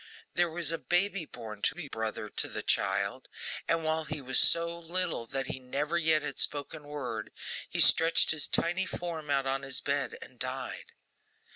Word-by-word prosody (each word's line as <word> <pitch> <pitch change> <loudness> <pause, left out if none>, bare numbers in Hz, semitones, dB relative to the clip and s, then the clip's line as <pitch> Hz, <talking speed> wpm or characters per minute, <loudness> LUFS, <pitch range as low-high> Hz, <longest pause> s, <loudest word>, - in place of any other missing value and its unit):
There 175 -1 +2
was 165 -1 0
a 165 - -2
baby 185 0 +1
born 110 -6 -9
to - - +2
be 175 - -6
a - - -11
brother 110 -2 -4
to - - -1
the - - -5
child; - - 0 0.4
and 165 0 +1
while 160 0 0
he 150 0 -4
was 130 -1 +4
so 170 0 +5
little 170 -7 0
that 135 +2 -3
he 130 - -5
never 140 +5 -3
yet 160 -2 +3
had 145 -2 -5
spoken 145 +1 0
word, 130 -7 -5 0.4
he - - -3
stretched 165 0 +6
his 155 -3 +1
tiny 175 +3 +1
form 165 -4 -5
out 140 -1 +1
on 135 0 0
his 135 -1 -2
bed, 140 0 -2
and 125 - -13
died. 130 +1 -3
150 Hz, 185 wpm, -30 LUFS, 135-165 Hz, 0.4 s, stretched